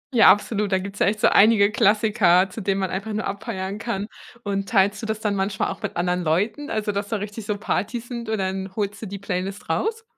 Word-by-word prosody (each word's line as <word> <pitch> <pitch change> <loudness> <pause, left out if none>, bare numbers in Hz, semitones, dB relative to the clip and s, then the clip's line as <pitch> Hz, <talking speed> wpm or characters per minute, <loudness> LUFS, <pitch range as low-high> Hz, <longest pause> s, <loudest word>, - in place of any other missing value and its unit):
Ja, 225 - +7
absolut, 205 0 0
da 190 - +3
gibt's 200 +2 -6
ja - - +3
echt 210 +1 0
so - - +6
einige 210 -1 +5
Klassiker, 210 -4 +3
zu 220 - -6
denen 195 0 0
man 190 - -1
einfach 200 +3 -4
nur 215 - -2
abfeiern 200 -1 -4
kann, 205 -3 -3 0.4
und 195 -1 -2
teilst 200 -1 +2
du 220 - -5
das 220 0 -3
dann 210 -2 0
manchmal 195 0 -1
auch - - -8
mit - - -4
anderen 180 +1 0
Leuten, 205 - 0
also 215 -1 -1
dass 200 0 -3
da 225 - -1
richtig 210 +1 -6
so 210 -1 -1
Partys 230 +4 -3
sind 235 -2 -5
und 220 - 0
dann 190 0 -3
holst 205 -1 -3
du 220 - -5
die 200 +1 -6
Playlist 195 +1 -4
raus? 455 +1 -1
205 Hz, 235 wpm, -23 LUFS, 195-220 Hz, 0.4 s, Ja